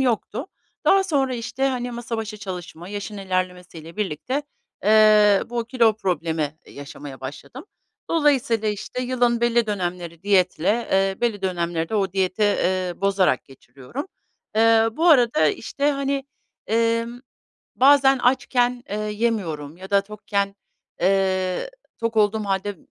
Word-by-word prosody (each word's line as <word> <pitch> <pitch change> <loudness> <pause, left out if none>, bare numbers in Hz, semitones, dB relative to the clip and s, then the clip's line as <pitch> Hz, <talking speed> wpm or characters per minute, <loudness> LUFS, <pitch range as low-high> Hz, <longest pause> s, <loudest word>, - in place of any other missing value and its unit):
yoktu. 250 - -1 0.4
Daha 390 0 +5
sonra, 275 -8 0
işte, 250 +3 -1
hani, 245 -2 -3
masa 235 -1 -5
başı 220 -1 -5
çalışma, 180 -4 -8
yaşın 205 +1 -6
ilerlemesiyle 180 -3 -4
birlikte, 210 - -2 0.4
eee, 210 -1 +6
bu 235 -1 -2
kilo 235 -2 +3
problemi 160 -6 -2
yaşamaya 140 -1 -10
başladım. 145 - -8 0.5
Dolayısıyla, 275 -8 +2
işte, 210 +4 -4
yılın 245 -2 +1
belli 235 -1 +2
dönemleri 175 -4 -4
diyetle, 200 +3 +2
eee, 195 0 +1
belli 225 -5 -1
dönemleri 170 -3 -1
de - - -4
o 195 -3 0
diyeti, 190 +1 0
eee, 185 -3 +1
bozarak 195 -8 +1
geçiriyorum. 135 - -9 0.5
Eee, 225 0 +5
bu 330 +9 +2
arada, 240 - +5
işte, 285 - -1
hani, 275 -1 -1 0.4
emm, 230 +2 0 0.6
bazen 270 0 +5
açken, 245 -1 +1
eee, 205 - -2
yemiyorum 210 -9 -2
ya 190 +2 -11
da 200 0 +5
tokken, 200 -1 -3 0.5
eee, 190 - +1 0.3
tok 230 0 -2
olduğum 215 0 +2
hâlde 195 0 -2
210 Hz, 130 wpm, -23 LUFS, 185-240 Hz, 0.6 s, eee